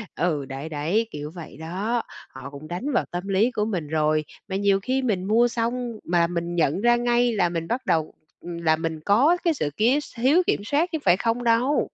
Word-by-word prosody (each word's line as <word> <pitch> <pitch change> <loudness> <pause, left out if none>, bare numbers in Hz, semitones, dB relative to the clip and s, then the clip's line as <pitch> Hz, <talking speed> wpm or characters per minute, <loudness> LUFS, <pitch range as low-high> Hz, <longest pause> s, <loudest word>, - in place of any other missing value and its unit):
Ừ, 155 -5 0
đấy, 135 +4 -6
đấy, 165 +10 0
kiểu 150 +1 -6
vậy 160 -4 -9
đó, 200 +9 -2 0.3
họ 130 - -9
cũng 140 +2 -10
đánh 185 +12 -3
vào - - +2
tâm 180 +3 -4
lý 205 +6 +2
của 210 -2 -1
mình 180 -9 -3
rồi. 155 0 +1 0.2
Mà 190 - -4
nhiều 200 0 +2
khi 260 +4 0
mình 205 -7 0
mua 225 +4 +3
xong 240 +1 -2
mà 170 -1 +2
mình 170 0 -3
nhận 165 +3 +1
ra 240 0 +5
ngay 240 0 +2
là 180 -5 +2
mình 165 -1 -3
bắt 250 +2 -2
đầu, 160 -5 0 0.3
ừm, 175 -1 -7
là 160 -1 +4
mình 160 -1 -4
có 275 +13 +4
cái 335 -2 +3
sự 150 - -2
kiếu 245 +7 +3
s 290 - -11
thiếu 285 +10 +4
kiểm 205 - +1
soát 310 +8 +1
chứ 320 - -1
phải 180 0 +5
không 235 +2 -1
đâu. 240 +5 +3
195 Hz, 225 wpm, -24 LUFS, 165-240 Hz, 0.3 s, ra